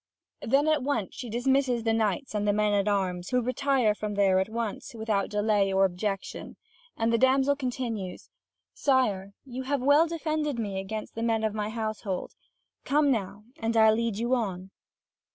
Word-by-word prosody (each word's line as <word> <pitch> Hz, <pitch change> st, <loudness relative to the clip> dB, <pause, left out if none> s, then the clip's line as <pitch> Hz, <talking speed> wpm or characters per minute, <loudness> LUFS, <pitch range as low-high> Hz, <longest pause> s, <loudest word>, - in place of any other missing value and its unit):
Then 275 Hz, +6 st, +2 dB
at 310 Hz, -2 st, +3 dB
once 250 Hz, -7 st, -2 dB
she 245 Hz, -, -7 dB
dismisses 250 Hz, +1 st, +1 dB
the 225 Hz, -1 st, +1 dB
knights 220 Hz, +3 st, -1 dB
and 210 Hz, -1 st, -1 dB
the 205 Hz, -, +3 dB
men 210 Hz, 0 st, +2 dB
at 200 Hz, 0 st, +1 dB
arms, 185 Hz, -3 st, -1 dB
who 250 Hz, -, +2 dB
retire 255 Hz, -2 st, +1 dB
from 210 Hz, 0 st, -4 dB
there 195 Hz, -2 st, +4 dB
at 190 Hz, +2 st, -1 dB
once, 230 Hz, 0 st, -4 dB
without 220 Hz, -3 st, -1 dB
delay 210 Hz, -2 st, +1 dB
or 195 Hz, 0 st, +4 dB
objection. 195 Hz, +1 st, -4 dB, 0.4 s
And 225 Hz, +1 st, +1 dB
the 230 Hz, -, +3 dB
damsel 270 Hz, +2 st, +4 dB
continues: 240 Hz, -8 st, -4 dB, 0.4 s
"Sire 205 Hz, -8 st, +1 dB
you 255 Hz, -1 st, -6 dB
have 265 Hz, 0 st, -1 dB
well 290 Hz, +4 st, +5 dB
defended 310 Hz, -4 st, -2 dB
me 200 Hz, -4 st, -3 dB
against 215 Hz, +3 st, -5 dB
the 225 Hz, -, -5 dB
men 225 Hz, -1 st, +1 dB
of 215 Hz, -1 st, 0 dB
my 210 Hz, -1 st, -2 dB
household. 215 Hz, -4 st, -4 dB, 0.5 s
Come 290 Hz, 0 st, +3 dB
now, 200 Hz, -3 st, -2 dB, 0.2 s
and 225 Hz, 0 st, -1 dB
I'll 220 Hz, -1 st, +6 dB
lead 230 Hz, -2 st, -1 dB
you 235 Hz, +3 st, 0 dB
on." 190 Hz, -6 st, -2 dB
225 Hz, 175 wpm, -27 LUFS, 205-260 Hz, 0.5 s, I'll